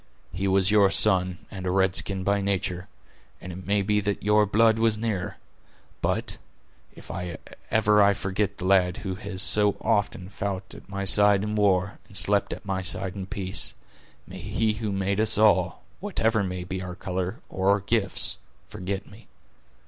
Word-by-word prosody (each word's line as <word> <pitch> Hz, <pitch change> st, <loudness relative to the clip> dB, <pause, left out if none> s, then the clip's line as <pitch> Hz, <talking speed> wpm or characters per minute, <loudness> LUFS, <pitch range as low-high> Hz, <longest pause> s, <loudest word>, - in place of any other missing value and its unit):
He 95 Hz, +2 st, -2 dB
was 95 Hz, +1 st, +3 dB
your 105 Hz, -2 st, +5 dB
son, 95 Hz, -3 st, +2 dB
and 95 Hz, -2 st, -6 dB
a -, -, +1 dB
red 95 Hz, 0 st, +2 dB
skin 95 Hz, -1 st, -1 dB
by 100 Hz, +1 st, +1 dB
nature; 95 Hz, -2 st, -2 dB, 0.5 s
and 90 Hz, -, -8 dB
it 95 Hz, +2 st, -9 dB
may 100 Hz, 0 st, +2 dB
be 105 Hz, +1 st, +2 dB
that 100 Hz, -1 st, -2 dB
your 105 Hz, 0 st, +3 dB
blood 110 Hz, +2 st, +3 dB
was 110 Hz, -1 st, +2 dB
nearer—but, 105 Hz, -5 st, -5 dB, 0.6 s
if -, -, -11 dB, 0.6 s
ever 105 Hz, -1 st, +4 dB
I 100 Hz, 0 st, +5 dB
forget 100 Hz, 0 st, -2 dB
the 90 Hz, -, -5 dB
lad 95 Hz, -1 st, +3 dB
who 95 Hz, -, -2 dB
has 95 Hz, 0 st, +1 dB
so 105 Hz, -1 st, +4 dB
often 100 Hz, -3 st, -1 dB
fou't 95 Hz, -1 st, -5 dB
at -, -, -13 dB
my 100 Hz, -1 st, -4 dB
side 105 Hz, +1 st, +5 dB
in 105 Hz, 0 st, -3 dB
war, 100 Hz, -2 st, +1 dB
and 100 Hz, -, -5 dB
slept 100 Hz, 0 st, +1 dB
at -, -, -7 dB
my 95 Hz, -1 st, -2 dB
side 95 Hz, 0 st, 0 dB
in 95 Hz, -2 st, -6 dB
peace, 95 Hz, -2 st, -2 dB, 0.5 s
may -, -, -10 dB
He 110 Hz, -1 st, 0 dB
who 105 Hz, -1 st, -4 dB
made 100 Hz, +1 st, -1 dB
us 110 Hz, -1 st, +2 dB
all, 95 Hz, -4 st, +3 dB, 0.2 s
whatever 115 Hz, -, 0 dB
may 90 Hz, -1 st, -4 dB
be 95 Hz, +1 st, -5 dB
our 90 Hz, -1 st, -6 dB
color 95 Hz, +1 st, -4 dB
or 95 Hz, +1 st, -1 dB
our 100 Hz, +1 st, +4 dB
gifts, 100 Hz, -1 st, 0 dB, 0.3 s
forget 95 Hz, +2 st, -5 dB
me! 105 Hz, +3 st, -16 dB
100 Hz, 175 wpm, -26 LUFS, 95-105 Hz, 0.6 s, your